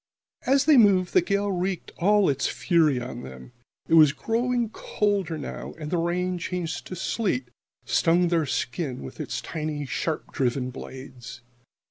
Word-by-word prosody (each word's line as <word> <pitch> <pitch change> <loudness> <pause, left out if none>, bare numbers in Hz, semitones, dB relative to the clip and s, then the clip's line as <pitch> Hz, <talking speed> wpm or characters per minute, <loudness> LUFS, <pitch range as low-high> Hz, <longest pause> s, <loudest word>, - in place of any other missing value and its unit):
As 275 +1 +4
they 305 -3 +6
moved, 195 -5 +5
the - - +6
gale 200 +3 0
wreaked 185 -1 -2
all 205 +2 +4
its 140 -1 +1
fury 160 -7 +2
on 125 0 -6
them. 65 - -10 0.4
It - - -1
was 155 -3 +7
growing 235 +5 0
colder 200 -7 -1
now, 145 - -7
and 150 -1 -6
the 175 - +1
rain, 180 +1 -1
changed 175 -1 -4
to 185 - -6
sleet, 170 - -1 0.4
stung 170 +1 +3
their 165 -3 +1
skins 130 - -3
with 65 - -9
its - - -3
tiny, 155 -2 -4
sharp 155 +4 -3
driven 130 -1 0
blades. 130 -2 -9
165 Hz, 155 wpm, -26 LUFS, 140-190 Hz, 0.4 s, was